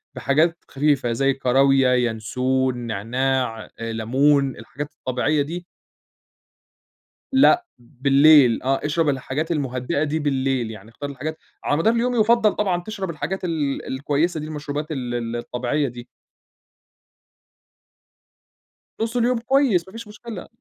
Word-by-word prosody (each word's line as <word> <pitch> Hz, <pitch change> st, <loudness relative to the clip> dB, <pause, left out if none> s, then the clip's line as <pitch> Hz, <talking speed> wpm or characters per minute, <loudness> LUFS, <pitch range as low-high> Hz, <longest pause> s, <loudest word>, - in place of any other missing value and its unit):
بحاجات 160 Hz, +5 st, +2 dB
خفيفة 140 Hz, -3 st, +1 dB
زي 135 Hz, +4 st, +2 dB
الكراويا، 135 Hz, 0 st, +3 dB
ينسون، 125 Hz, +2 st, 0 dB
نعناع، 120 Hz, +1 st, -2 dB
لمون، 130 Hz, +5 st, +1 dB
الحاجات 145 Hz, +1 st, -7 dB
الطبيعية 130 Hz, +4 st, 0 dB
دي 170 Hz, +5 st, -5 dB, 1.7 s
لأ، 350 Hz, +7 st, +5 dB
بالليل 135 Hz, +1 st, +5 dB
آه، 135 Hz, +1 st, +1 dB
اشرب 150 Hz, +1 st, +1 dB
الحاجات 140 Hz, +5 st, -2 dB
المهدِّئة 135 Hz, -1 st, -1 dB
دي 155 Hz, +1 st, -1 dB
بالليل، 135 Hz, -5 st, 0 dB
يعني 110 Hz, 0 st, -11 dB
اختار 145 Hz, +5 st, -7 dB
الحاجات 150 Hz, +4 st, -5 dB, 0.3 s
على 145 Hz, -, +1 dB
مدار 220 Hz, +8 st, +3 dB
اليوم 245 Hz, +1 st, 0 dB
يُفضّل 225 Hz, -1 st, +4 dB
طبعًا 180 Hz, -4 st, 0 dB
تشرب 195 Hz, -3 st, -5 dB
الحاجات 170 Hz, +5 st, -4 dB
ال 155 Hz, -5 st, -2 dB
الكويسة 145 Hz, +5 st, -1 dB
دي 150 Hz, -, -5 dB
المشروبات 150 Hz, 0 st, -5 dB
ال 125 Hz, -5 st, -3 dB
ال 115 Hz, -1 st, -3 dB
الطبيعية 125 Hz, +4 st, -1 dB
دي. 120 Hz, 0 st, -9 dB, 2.9 s
نُص 230 Hz, +2 st, -1 dB
اليوم 240 Hz, 0 st, +2 dB
كويس 235 Hz, -8 st, +2 dB
ما -, -, -12 dB
فيش 230 Hz, +1 st, -9 dB
مشكلة، 210 Hz, -2 st, -9 dB
145 Hz, 120 wpm, -22 LUFS, 130-170 Hz, 2.9 s, لأ